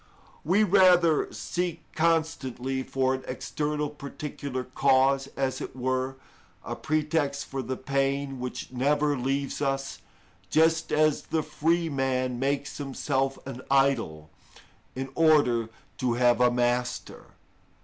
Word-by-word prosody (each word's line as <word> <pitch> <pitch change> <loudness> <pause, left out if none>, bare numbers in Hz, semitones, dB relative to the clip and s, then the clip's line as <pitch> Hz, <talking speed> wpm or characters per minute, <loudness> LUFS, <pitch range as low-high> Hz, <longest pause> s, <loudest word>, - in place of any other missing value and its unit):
We 190 +7 +3
rather 180 -5 +4
seek 175 -2 -3
constantly 140 -6 0
for 130 0 0
an 130 - -4
external 150 +3 -2
particular 140 -2 -6
cause, 135 +1 +2
as 135 -1 -1
it - - -6
were, 130 +1 -1 0.5
a - - -4
pretext 150 -2 -1
for 135 -1 -4
the 130 +1 -4
pain 135 0 -1
which 125 0 -5
never 145 +3 +1
leaves 135 +2 -2
us, 135 -1 -2 0.5
just 160 +1 +3
as 155 -1 +2
the 160 -1 0
free 165 +3 0
man 130 -3 -1
makes 140 +2 -1
himself 135 -1 -1
an 130 -2 -7
idol, 120 - +1 0.6
in 135 +1 -4
order 145 -8 +3 0.3
to 125 -2 +1
have 120 0 +3
a 125 - +6
master. 125 0 -1
135 Hz, 120 wpm, -27 LUFS, 130-150 Hz, 0.6 s, a